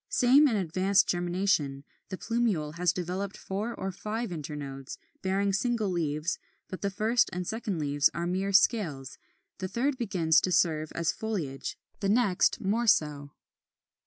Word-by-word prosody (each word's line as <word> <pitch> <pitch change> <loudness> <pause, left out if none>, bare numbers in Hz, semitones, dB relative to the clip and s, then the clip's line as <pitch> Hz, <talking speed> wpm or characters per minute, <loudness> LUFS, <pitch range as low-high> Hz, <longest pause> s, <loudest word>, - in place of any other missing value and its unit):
Same 270 +5 +5
in 235 - +1
advanced 190 +1 +2
germination: 175 -6 0 0.3
the 190 - -5
plumule 210 -12 -1
has 175 -1 +3
developed 180 +3 -4
four 210 +5 -4
or 190 - -4
five 215 +3 -4
internodes, 140 -4 -6 0.2
bearing 195 +1 0
single 225 0 0
leaves; 160 +1 -1 0.3
but 185 - -7
the 200 - 0
first 220 +4 +2
and 180 0 -4
second 215 -2 -3
leaves 145 -1 +2
are 170 - -3
mere 190 +3 -1
scales, 165 - +2 0.4
the 185 - -2
third 260 +6 -1
begins 175 -8 +2
to 185 - -1
serve 155 -3 +2
as 165 -1 0
foliage; 175 -12 -4 0.2
the 195 - -1
next 205 -4 +3
more 225 +5 0
so. 150 -7 +2
185 Hz, 150 wpm, -29 LUFS, 160-215 Hz, 0.4 s, Same